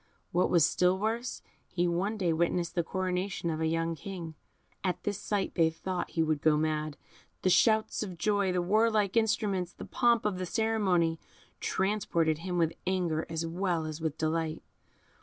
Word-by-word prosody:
What 180 +1 +2
was 170 -4 +5
still 180 +3 +2
worse, 225 +4 -2 0.2
he 175 0 0
one 190 +6 0
day 175 -5 +1
witnessed 170 +1 0
the 175 - +1
coronation 185 -1 -2
of 160 0 -3
a 160 - +2
young 165 +1 0
King. 170 -2 -7 0.5
At 180 -2 -1
this 205 -1 -2
sight 205 -2 -1
they 165 -2 +4
thought 180 +3 -4
he 165 - +1
would 155 -2 0
go 155 -1 +4
mad. 155 -1 -1 0.5
The 185 - +3
shouts 220 +3 +3
of 185 -5 -5
joy, 200 +2 +1
the 180 -1 0
warlike 215 +1 +2
instruments, 205 -5 +1
the - - -9
pomp 235 -3 +2
of 195 -3 0
the 185 - -3
ceremony, 190 -7 +1 0.4
transported 175 -5 0
him 180 +1 -3
with 165 -1 +2
anger 175 -4 0
as 165 0 -2
well 170 -1 -1
as 155 0 -5
delight. 160 0 -2
180 Hz, 170 wpm, -30 LUFS, 165-200 Hz, 0.5 s, was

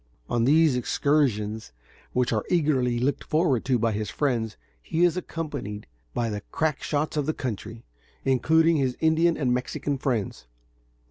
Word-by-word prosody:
On 120 -1 +1
these 155 0 +5
excursions, 115 - 0 0.4
which 125 -1 +1
are 110 - 0
eagerly 140 -8 +2
looked 130 +3 0
forward 150 -7 +1
to 130 -2 +2
by 115 0 +1
his 105 0 -3
friends, 115 -7 -1 0.2
he 160 - 0
is 175 -1 +4
accompanied 145 - -5 0.3
by 120 -1 0
the 105 0 -4
crack 160 -3 0
shots 150 +1 -1
of 145 -1 0
the 155 - 0
country, 115 -2 -5 0.4
including 160 +5 +3
his 130 -3 0
Indian 160 +1 +3
and 125 -4 +1
Mexican 130 +2 -2
friends. 110 - -2
130 Hz, 150 wpm, -26 LUFS, 115-155 Hz, 0.4 s, these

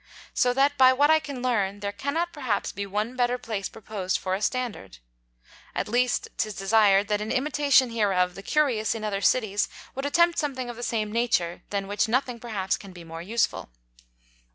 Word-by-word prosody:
So 250 - +3
that 280 +1 +2
by 260 0 +8
what 290 +4 +4
I 315 - +6
can 280 -5 -7
learn, 205 -5 0
there 200 0 -2
cannot 310 +10 -2
perhaps 245 -9 -2
be 200 0 -5
one 210 +5 -2
better 245 0 +1
Place 215 -5 -4
proposed 195 -4 -3
for 185 - -3
a 190 - -2
Standard. 230 - -3 0.8
At - - -1
least 245 +3 +1
'tis 215 -2 -2
desired, 200 0 +4
that 210 0 +1
in 215 - -3
Imitation 280 -2 +3
hereof 190 -5 +1
the 195 - -9
Curious 235 -4 +1
in 220 - -6
other 200 -2 -2
Cities 205 -3 +2 0.2
would 270 +2 -3
attempt 340 +3 +3
something 260 -5 -2
of - - -11
the 240 - -9
same 215 -3 -1
Nature, 215 -7 0
than 200 -1 -2
which 205 +3 0
nothing 245 +1 0
perhaps 210 -5 -2
can 195 -2 -12
be 175 -1 -11
more 165 0 -8
useful. 225 - -1
225 Hz, 190 wpm, -26 LUFS, 200-255 Hz, 0.8 s, by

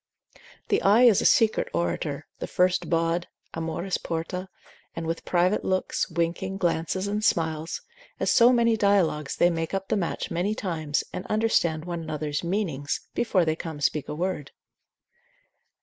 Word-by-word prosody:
The - - +2
eye 210 +5 +5
is 230 -6 +6
a - - +4
secret 220 -1 +3
orator, 85 0 -2
the - - -4
first 180 0 +1
bawd, 165 +1 +1 0.3
Amoris 165 +3 -2
porta, 170 +3 -4 0.5
and 165 - -4
with 165 +1 -3
private 180 +3 +2
looks, 185 0 -1
winking, 170 +3 -2
glances 175 +1 -1
and 210 +1 -2
smiles, 160 -3 0 0.4
as - - +1
so 240 0 +6
many 230 -2 +3
dialogues 190 -9 +2
they 175 - +4
make 165 +2 -2
up 195 0 -4
the - - +2
match 175 -4 -3
many 185 +5 0
times, 155 -8 -2
and 185 - -4
understand 175 -8 +1
one 170 -1 -4
another's 155 -1 -3
meanings, 170 -7 -2
before 190 -7 +2
they 155 0 +1
come 160 -2 -6
to 145 - -7
speak 150 0 0
a - - -3
word. 170 -4 -3
170 Hz, 160 wpm, -26 LUFS, 160-195 Hz, 0.5 s, is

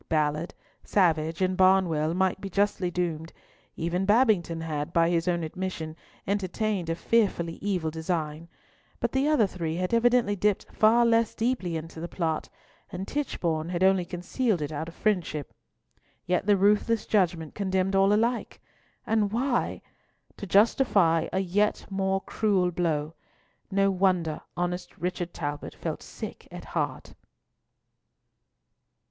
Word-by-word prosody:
Ballard, 155 +1 0 0.3
Savage, 165 -2 +1
and 185 0 +1
Barnwell 180 -4 +3
might 190 +1 +1
be 195 - -5
justly 200 -1 +1
doomed; 170 -2 -3 0.4
even 170 +3 -1
Babington 205 -8 +3
had, 155 -1 -3
by 170 0 +3
his 170 0 0
own 175 -1 +1
admission, 160 -2 -4 0.3
entertained 200 -1 -1
a 165 - 0
fearfully 170 -5 0
evil 180 -6 -1
design; 160 -1 -3 0.5
but - - -1
the 265 +2 +1
other 300 -8 +4
three 165 -4 -3
had 180 +4 -2
evidently 235 -2 +3
dipped 205 0 +1
far 230 +2 +5
less 230 -1 +2
deeply 225 -8 -1
into 160 +1 -8
the 170 - -4
plot, 165 -3 -2 0.4
and 185 +2 -5
Tichborne 170 - -2
had 180 0 -1
only 190 -1 +4
concealed 180 +5 -1
it 150 0 -3
out 155 +1 -4
of 170 - -10
friendship. 175 -8 -1 0.7
Yet 180 +3 0
the 205 -1 +5
ruthless 210 +3 +2
judgment 170 -6 +1
condemned 190 -1 0
all 195 +1 +4
alike! 230 +4 0 0.5
And 215 -2 +1
why? 245 +2 -1 0.5
To 200 - -7
justify 195 -5 +3
a - - -1
yet 205 +3 0
more 195 0 0
cruel 195 -5 +1
blow! 160 -3 -1 0.6
No 195 0 +2
wonder 180 -5 +1 0.2
honest 175 0 -3
Richard 180 -1 -3
Talbot 145 -3 -5
felt - - -4
sick - - -8
at - - -9
heart. - - -3
185 Hz, 140 wpm, -27 LUFS, 165-205 Hz, 0.7 s, far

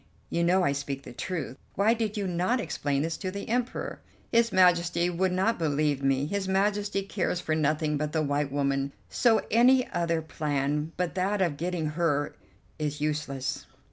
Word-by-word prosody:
You 170 - +1
know 180 +2 +3
I 140 - +3
speak 140 -1 -4
the - - -10
truth; 165 -1 -4 0.2
why 210 +4 +4
did 220 -2 -2
you 200 - -1
not 185 +7 +1
explain 145 - -1
this 165 0 -2
to 190 - -3
the 200 +2 -6
Emperor?" 245 +2 -2 0.3
"His 230 -1 +3
Majesty 175 -1 +3
would 185 +2 +1
not 190 +5 +1
believe 150 -3 +1
me; 135 0 +2
his 195 +4 -2
Majesty 200 +1 +1
cares 185 -2 -1
for 160 - -2
nothing 155 0 +1
but 150 +1 -2
the 155 0 +1
white 145 -1 0
woman; 140 0 0 0.2
so 225 -3 +3
any 250 +3 +5
other 170 -1 0
plan 150 0 -1
but 180 -1 -1
that 195 +2 0
of 175 -6 +1
getting 175 +1 -2
her 150 -2 0 0.5
is 150 -1 -2
useless." 145 -2 -2
170 Hz, 175 wpm, -28 LUFS, 145-190 Hz, 0.5 s, any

